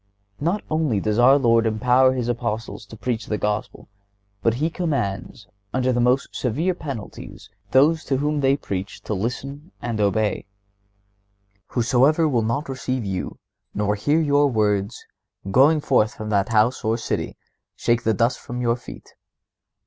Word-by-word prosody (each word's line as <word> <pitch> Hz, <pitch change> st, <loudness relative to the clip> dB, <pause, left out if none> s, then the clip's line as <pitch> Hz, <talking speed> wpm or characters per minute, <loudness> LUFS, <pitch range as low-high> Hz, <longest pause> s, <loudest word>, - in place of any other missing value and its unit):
Not 175 Hz, +8 st, -1 dB
only 155 Hz, -9 st, 0 dB
does 105 Hz, +3 st, 0 dB
our 130 Hz, +3 st, +7 dB
Lord 115 Hz, -4 st, +3 dB
empower 125 Hz, +4 st, +3 dB
His 125 Hz, -2 st, -2 dB
Apostles 115 Hz, -3 st, -3 dB
to 110 Hz, -, -11 dB
preach 115 Hz, 0 st, -3 dB
the 105 Hz, -, -1 dB
Gospel, 105 Hz, 0 st, -3 dB, 0.5 s
but 115 Hz, +2 st, +2 dB
He 155 Hz, +6 st, -1 dB
commands, 130 Hz, -, -3 dB
and 90 Hz, -, -35 dB, 0.3 s
under 130 Hz, -, +3 dB
the 120 Hz, -, 0 dB
most 125 Hz, +3 st, +1 dB
severe 155 Hz, +10 st, 0 dB
penalties, 140 Hz, -, -8 dB, 0.2 s
those 155 Hz, +5 st, +4 dB
to 135 Hz, -, 0 dB
whom 150 Hz, +2 st, 0 dB
they 135 Hz, 0 st, +3 dB
preach 95 Hz, -7 st, -5 dB
to -, -, -4 dB
listen 135 Hz, -, -4 dB
and 115 Hz, -3 st, -3 dB
obey. 105 Hz, 0 st, 0 dB, 1.2 s
"Whosoever 135 Hz, +6 st, +3 dB
will 125 Hz, -6 st, +1 dB
not 115 Hz, +7 st, -1 dB
receive 130 Hz, -3 st, -3 dB
you, 95 Hz, -2 st, -4 dB, 0.4 s
nor 105 Hz, 0 st, +1 dB
hear 145 Hz, +10 st, +1 dB
your 145 Hz, -2 st, +3 dB
words, 105 Hz, -3 st, 0 dB, 0.5 s
going 145 Hz, +7 st, +5 dB
forth 120 Hz, -7 st, +2 dB
from 110 Hz, 0 st, -6 dB
that 100 Hz, -1 st, +1 dB
house 110 Hz, +3 st, +2 dB
or 110 Hz, +1 st, +1 dB
city, 115 Hz, -, -3 dB, 0.4 s
shake 120 Hz, 0 st, +1 dB
the 110 Hz, -2 st, +1 dB
dust 115 Hz, +5 st, +1 dB
from 120 Hz, 0 st, -6 dB
your 120 Hz, -1 st, +1 dB
feet. 125 Hz, -, -12 dB
120 Hz, 155 wpm, -23 LUFS, 110-140 Hz, 1.2 s, our